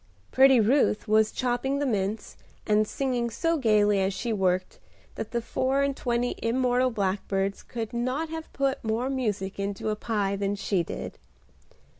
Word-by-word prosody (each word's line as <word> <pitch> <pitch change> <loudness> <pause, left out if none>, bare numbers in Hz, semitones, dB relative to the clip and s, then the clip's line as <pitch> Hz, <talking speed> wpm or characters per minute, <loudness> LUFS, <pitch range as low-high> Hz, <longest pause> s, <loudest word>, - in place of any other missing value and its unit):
Pretty 265 -1 +6
Ruth 230 0 +2
was 215 0 +3
chopping 255 +2 -1
the 285 - 0
mince, 210 -3 -2 0.3
and 215 0 +3
singing 250 -3 -1
so 330 +8 0
gaily 210 -5 +3
as 190 0 0
she 235 +2 -2
worked 185 -2 0 0.3
that 220 - -5
the 235 -1 -2
four 265 +4 0
and 280 -1 0
twenty 245 -1 -1
immortal 250 +2 +2
blackbirds 195 -2 -1
could 225 -2 -6
not 255 +7 -1
have 320 0 -7
put 275 0 -1
more 230 +4 -1
music 205 -7 -2
into 200 +1 -2
a 215 - 0
pie 205 -3 -1
than 200 0 -1
she 195 -2 0
did. 170 - -6
230 Hz, 160 wpm, -27 LUFS, 205-260 Hz, 0.3 s, Pretty